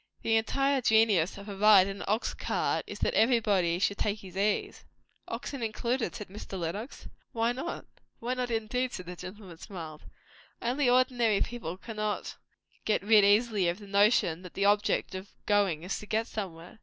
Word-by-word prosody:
The 225 Hz, -, +2 dB
entire 275 Hz, +4 st, +1 dB
genius 220 Hz, -7 st, +3 dB
of 200 Hz, +1 st, -10 dB
a 200 Hz, -, -6 dB
ride 205 Hz, -1 st, +7 dB
in 195 Hz, 0 st, -5 dB
an -, -, -6 dB
ox 215 Hz, +3 st, 0 dB
cart -, -, -1 dB
is, -, -, -7 dB
that -, -, +1 dB
everybody 210 Hz, -7 st, +3 dB
should 200 Hz, +2 st, 0 dB
take 210 Hz, 0 st, -1 dB
his 185 Hz, -2 st, -12 dB
ease." 205 Hz, +2 st, -1 dB, 0.4 s
"Oxen 275 Hz, -3 st, -5 dB
included?" 235 Hz, +2 st, -2 dB
said 210 Hz, -, -7 dB
Mr. 195 Hz, -1 st, -7 dB
Lenox. 200 Hz, -, -5 dB, 0.3 s
"Why 230 Hz, 0 st, +1 dB
not?" 265 Hz, +8 st, -5 dB, 0.3 s
"Why 240 Hz, +2 st, -2 dB
not, 250 Hz, -1 st, -2 dB
indeed!" 240 Hz, +3 st, -1 dB
said 185 Hz, -, -6 dB
the 180 Hz, +1 st, -7 dB
gentleman, 185 Hz, -1 st, -10 dB
smiling. 160 Hz, -5 st, -8 dB, 0.6 s
"Only, 250 Hz, +2 st, +1 dB
ordinary 245 Hz, -4 st, +3 dB
people 205 Hz, -8 st, -3 dB
cannot 215 Hz, 0 st, -4 dB, 0.5 s
get 215 Hz, -, 0 dB
rid 210 Hz, 0 st, +6 dB
easily 205 Hz, -1 st, +3 dB
of 170 Hz, -, -2 dB
the 205 Hz, -, -12 dB
notion 200 Hz, -4 st, +3 dB
that 180 Hz, -2 st, -12 dB
the 200 Hz, -, +1 dB
object 205 Hz, -1 st, +2 dB
of 190 Hz, +1 st, -8 dB
going 200 Hz, -6 st, +2 dB
is 185 Hz, -, -3 dB
to 210 Hz, -, -11 dB
get 220 Hz, +2 st, 0 dB
somewhere." 185 Hz, -3 st, -7 dB
210 Hz, 180 wpm, -29 LUFS, 190-230 Hz, 0.6 s, ride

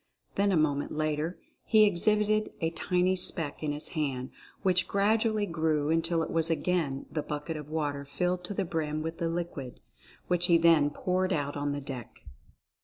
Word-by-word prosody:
Then 200 Hz, 0 st, +2 dB
a 185 Hz, -, +3 dB
moment 145 Hz, -2 st, +1 dB
later 155 Hz, +2 st, -1 dB, 0.3 s
he 215 Hz, -1 st, +5 dB
exhibited 210 Hz, +2 st, +2 dB
a 165 Hz, 0 st, 0 dB
tiny 180 Hz, +2 st, +1 dB
speck 165 Hz, -4 st, -1 dB
in 150 Hz, -1 st, -1 dB
his 145 Hz, +1 st, 0 dB
hand, 135 Hz, -5 st, -2 dB, 0.3 s
which 185 Hz, -2 st, +2 dB
gradually 215 Hz, +1 st, +2 dB
grew 160 Hz, -4 st, 0 dB
until 165 Hz, 0 st, +2 dB
it -, -, -5 dB
was 165 Hz, 0 st, +2 dB
again 165 Hz, -4 st, 0 dB
the 155 Hz, -, -1 dB
bucket 150 Hz, +2 st, -4 dB
of 150 Hz, -1 st, -7 dB
water 145 Hz, -3 st, -2 dB
filled 180 Hz, +5 st, -2 dB
to 205 Hz, -, -4 dB
the 195 Hz, -, 0 dB
brim 155 Hz, -2 st, -2 dB
with 165 Hz, +1 st, -5 dB
the 170 Hz, -1 st, 0 dB
liquid, 165 Hz, -7 st, -5 dB, 0.5 s
which 175 Hz, 0 st, +2 dB
he 170 Hz, -, +6 dB
then 165 Hz, -3 st, +5 dB
poured 185 Hz, +4 st, -1 dB
out 145 Hz, -4 st, -1 dB
on 145 Hz, 0 st, -1 dB
the 145 Hz, 0 st, -3 dB
deck. 130 Hz, -4 st, -8 dB
165 Hz, 180 wpm, -29 LUFS, 150-180 Hz, 0.5 s, he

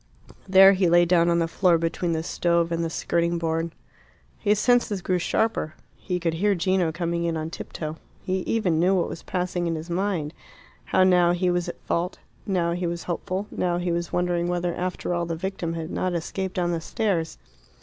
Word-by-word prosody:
There 195 Hz, +1 st, +8 dB
he 185 Hz, -2 st, +2 dB
lay 175 Hz, +1 st, +5 dB
down 170 Hz, -1 st, +3 dB
on 170 Hz, -, +3 dB
the 165 Hz, -1 st, +1 dB
floor 175 Hz, 0 st, +3 dB
between 165 Hz, +1 st, -1 dB
the 160 Hz, 0 st, -1 dB
stove 170 Hz, 0 st, +1 dB
and 170 Hz, 0 st, 0 dB
the 165 Hz, -, -1 dB
skirting 170 Hz, +1 st, 0 dB
board. 165 Hz, 0 st, -1 dB, 0.7 s
His 210 Hz, -1 st, +2 dB
senses 240 Hz, -3 st, +2 dB
grew 180 Hz, 0 st, 0 dB
sharper. 175 Hz, -4 st, 0 dB, 0.2 s
He 180 Hz, -1 st, -3 dB
could 165 Hz, -2 st, -1 dB
hear 200 Hz, +5 st, +2 dB
Gino 180 Hz, -1 st, +1 dB
coming 170 Hz, 0 st, -2 dB
in 165 Hz, -1 st, -1 dB
on 160 Hz, +1 st, -4 dB
tiptoe. 155 Hz, -2 st, -6 dB, 0.3 s
He 190 Hz, 0 st, -1 dB
even 180 Hz, -8 st, +1 dB
knew 185 Hz, +3 st, +3 dB
what 180 Hz, -, 0 dB
was -, -, -7 dB
passing 180 Hz, -1 st, -2 dB
in 165 Hz, -, -1 dB
his 160 Hz, +2 st, -6 dB
mind, 175 Hz, -4 st, -1 dB, 0.5 s
how 185 Hz, -, +3 dB
now 180 Hz, -2 st, +4 dB
he 180 Hz, 0 st, +1 dB
was 175 Hz, -1 st, -1 dB
at -, -, -8 dB
fault, 175 Hz, +2 st, -2 dB, 0.3 s
now 175 Hz, -4 st, +1 dB
he 175 Hz, +1 st, -1 dB
was 170 Hz, 0 st, -4 dB
hopeful, 185 Hz, +3 st, -3 dB
now 175 Hz, -1 st, 0 dB
he 175 Hz, 0 st, -1 dB
was 170 Hz, 0 st, -2 dB
wondering 175 Hz, -1 st, 0 dB
whether 175 Hz, 0 st, -1 dB
after 180 Hz, 0 st, -3 dB
all 170 Hz, -1 st, -1 dB
the 165 Hz, -, -2 dB
victim 175 Hz, -1 st, -3 dB
had 165 Hz, +1 st, -5 dB
not 185 Hz, -1 st, -1 dB
escaped 185 Hz, +3 st, -3 dB
down 175 Hz, -1 st, 0 dB
the 165 Hz, -1 st, -2 dB
stairs. 170 Hz, -3 st, -1 dB
175 Hz, 200 wpm, -25 LUFS, 170-185 Hz, 0.7 s, There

